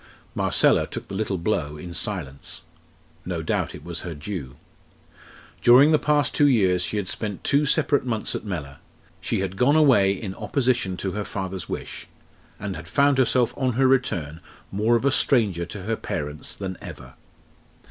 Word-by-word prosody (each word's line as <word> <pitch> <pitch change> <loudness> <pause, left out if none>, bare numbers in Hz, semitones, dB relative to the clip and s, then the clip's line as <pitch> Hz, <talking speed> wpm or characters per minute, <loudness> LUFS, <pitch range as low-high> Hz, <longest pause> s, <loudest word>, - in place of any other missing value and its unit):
Marcella - - +3
took - - -7
the - - -7
little 100 -1 -1
blow 85 -5 -1
in 85 +3 -8
silence. 85 -8 -4 0.6
No 85 -3 -4
doubt - - -1
it - - -11
was 85 -1 -4
her 85 -3 -6
due. 75 -4 -6 1.1
During 130 +6 +7
the 155 - +4
past 150 -1 +2
two 145 - +4
years 95 -9 +3
she 90 +4 -2
had 100 -2 -2
spent 105 0 -4
two 145 +1 +2
separate 145 -1 +2
months 115 -4 -2
at - - -4
Mellor; 80 -9 -5 0.4
she - - -1
had 95 0 -3
gone 135 +6 +4
away 130 -11 +5
in 95 -1 -6
opposition 120 -7 0
to 95 - -3
her 105 +1 -3
father's 95 -3 -5
wish; - - -6 0.5
and 100 -2 -4
had 80 +1 -9
found 140 - +3
herself 125 -2 +2
on 130 -2 0
her 130 +3 +3
return 85 - 0 0.3
more 110 +4 +2
of 115 - 0
a 140 - +4
stranger 105 - +2
to 95 +1 -8
her 110 +3 -1
parents 75 -6 -5
than 95 -3 -5
ever. - - -10
100 Hz, 175 wpm, -24 LUFS, 90-125 Hz, 1.1 s, During